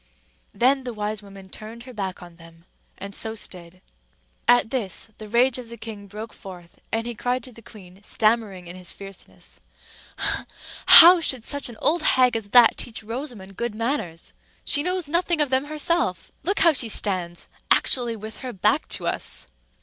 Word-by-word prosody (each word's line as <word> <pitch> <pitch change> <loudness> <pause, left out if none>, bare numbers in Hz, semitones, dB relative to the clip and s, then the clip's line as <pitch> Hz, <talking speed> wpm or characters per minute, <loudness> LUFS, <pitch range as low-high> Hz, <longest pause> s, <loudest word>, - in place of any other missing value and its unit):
Then 260 +6 +2
the 245 -2 -6
wise 210 0 -3
woman 195 -1 -13
turned 225 +4 -9
her 255 0 -11
back 190 -4 -5
on 175 -1 -14
them, 165 0 -17 0.3
and 200 +1 -8
so 220 +3 -1
stood. 180 -3 -6 0.6
At 245 -2 +4
this, 225 -5 -3
the 215 -1 -9
rage 245 +3 +2
of 240 -2 -10
the 235 - -9
king 210 -2 -9
broke 215 +3 -9
forth; 175 -3 -13
and 225 +1 -1
he 240 - -4
cried 245 +2 -2
to 255 - -9
the 230 - -15
queen, 190 -4 -15
stammering 215 -4 0
in 175 +1 -9
his 180 -1 -7
fierceness,— 195 -1 -12 1.3
"How 345 +2 +10
should 260 -8 +1
such 285 -3 +1
an 230 - -11
old 335 +2 +2
hag 255 -5 +3
as 220 -3 -3
that 240 0 +6
teach 225 -2 -7
Rosamond 225 -5 -7
good 235 -2 -3
manners? 220 - -4 0.3
She 290 - +3
knows 360 0 -2
nothing 340 +1 +1
of 295 -3 +1
them 260 +2 +1
herself! 300 - -1
Look 395 +4 -1
how 335 -1 +6
she 250 -5 +2
stands!—actually 200 +5 0
with 220 0 -8
her 255 -2 -7
back 185 - +1
to - - -8
us." - - -2
225 Hz, 175 wpm, -23 LUFS, 195-255 Hz, 1.3 s, How